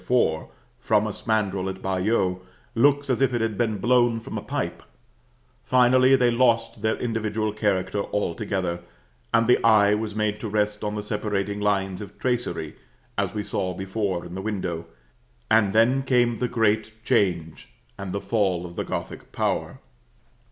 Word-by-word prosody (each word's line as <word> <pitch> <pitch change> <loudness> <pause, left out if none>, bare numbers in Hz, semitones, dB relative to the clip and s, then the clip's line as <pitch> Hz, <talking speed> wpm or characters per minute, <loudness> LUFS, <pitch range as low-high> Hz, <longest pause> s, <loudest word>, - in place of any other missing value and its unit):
4, 90 -8 +1 0.3
from 105 -1 +2
a 110 - -2
spandril 100 -3 -1
at 95 0 -6
Bayeux, 95 0 0 0.3
looks 145 +4 +3
as 130 -1 0
if 130 -2 +2
it 120 - 0
had 110 -1 -1
been 110 -1 0
blown 120 +2 +3
from 115 - -8
a - - -3
pipe; - - -3 0.8
finally, 130 +1 +5
they 125 -2 +3
lost 115 -3 +2
their 110 0 +1
individual 110 -2 -2
character 100 -2 0
altogether, 95 -2 -2 0.5
and 115 0 +3
the 125 - +3
eye 105 -2 +5
was 105 0 -2
made 105 -1 0
to 110 - -4
rest 105 0 0
on 105 0 -2
the 105 - -3
separating 105 -1 -2
lines 95 -2 0
of 105 - -10
tracery, 120 -11 -2 0.4
as - - -1
we 105 - -2
saw 95 -2 -2
before 95 -1 -2
in 85 - -9
the 95 - -4
window; 95 -5 -3 0.6
and 110 -3 +4
then 115 +5 +4
came 120 -3 +2
the 125 - 0
great 110 -1 0
change 90 -9 0 0.3
and 100 -2 -6
the 100 - -2
fall 95 -6 0
of 85 0 -9
the - - -2
Gothic - - -6
power. - - -2
105 Hz, 165 wpm, -25 LUFS, 95-115 Hz, 0.8 s, finally